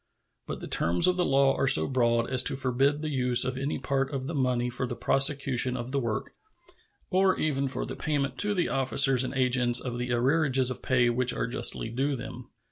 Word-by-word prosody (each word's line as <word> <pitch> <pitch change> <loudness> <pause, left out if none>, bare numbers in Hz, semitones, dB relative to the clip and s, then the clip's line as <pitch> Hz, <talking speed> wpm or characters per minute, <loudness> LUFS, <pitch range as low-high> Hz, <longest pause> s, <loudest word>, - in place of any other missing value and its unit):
But - - -7
the - - -7
terms 85 +1 +1
of 180 - +2
the 180 - 0
law 135 0 +2
are - - -1
so - - +5
broad 120 -3 0
as 130 -1 +1
to - - +2
forbid 135 +3 -1
the 155 - -4
use 125 -2 +3
of 130 - -3
any 140 +3 -3
part 135 +1 -2
of 135 -2 -5
the 165 - -5
money 125 -4 -1
for 125 +1 -4
the - - -5
prosecution 135 -2 +1
of 120 +1 -6
the 140 - -1
work, 115 -5 -4 0.8
or 190 0 +2
even 140 -3 -1
for 135 - -4
the - - -7
payment 140 -4 -3
to 205 0 +3
the 175 - 0
officers 135 -1 +3
and 130 - -5
agents 125 -2 +2
of 120 -2 -6
the 125 0 -4
arrearages 130 +1 +1
of - - -8
pay 125 -2 +1
which 125 +1 +1
are - - -3
justly 115 -1 0
due 135 +4 -2
to - - -7
them. 125 0 -10
130 Hz, 220 wpm, -26 LUFS, 125-140 Hz, 0.8 s, so